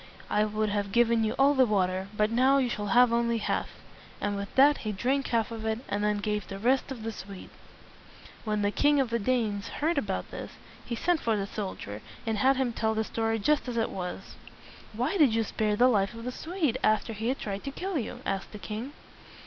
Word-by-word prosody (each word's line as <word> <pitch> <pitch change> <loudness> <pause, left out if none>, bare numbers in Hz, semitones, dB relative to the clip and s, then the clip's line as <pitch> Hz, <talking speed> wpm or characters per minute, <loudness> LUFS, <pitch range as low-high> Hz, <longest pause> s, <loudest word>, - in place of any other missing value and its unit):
I 210 - +3
would 215 0 -1
have 205 -1 -1
given 235 0 +3
you 220 +2 0
all 275 +2 +5
the 265 -2 +5
water, 190 -2 0
but 210 +1 +2
now 260 +4 +4
you 260 -3 +2
shall 205 -3 -3
have 240 +3 +5
only 235 0 +2
half." 220 - -1 0.5
And 205 0 -1
with 200 0 -6
that 285 +2 +6
he 215 - -3
drank 260 +7 0
the - - -5
half 230 0 +1
of 225 -1 -6
it, 220 0 0
and 205 +1 -1
then 210 0 +2
gave 210 -1 -2
the 195 - -6
rest 255 +6 +2
to 270 - -5
the 225 -1 -5
Swede. 195 -2 -10 0.9
When 210 -2 -1
the 205 - +2
King 290 +5 +3
of 260 -4 0
the 235 - +1
Danes 220 -2 0
heard 310 0 0
about 200 -7 -3
this, - - -7 0.3
he 235 - -4
sent 340 +6 +1
for 225 -2 +1
the 200 - -1
soldier 190 - -6 0.2
and 220 -2 -1
had 265 +4 +4
him 255 -3 0
tell 220 -1 0
the 220 - +1
story 225 0 -1
just 285 +7 +1
as 240 -1 -3
it 225 - 0
was. 180 -1 -6 0.6
"Why 250 - -1
did 265 -8 +5
you 225 - +2
spare 210 0 0
the 245 +4 +5
life 205 -2 +2
of 230 - -8
the 250 - -3
Swede 310 -4 -2
after 215 +1 +2
he 220 +2 -3
had 260 +2 0
tried 200 -1 -5
to 275 - -3
kill 365 +2 -3
you?" 225 - -6
asked 195 +1 -3
the - - -6
king. 220 +7 -6
225 Hz, 230 wpm, -28 LUFS, 210-255 Hz, 0.9 s, that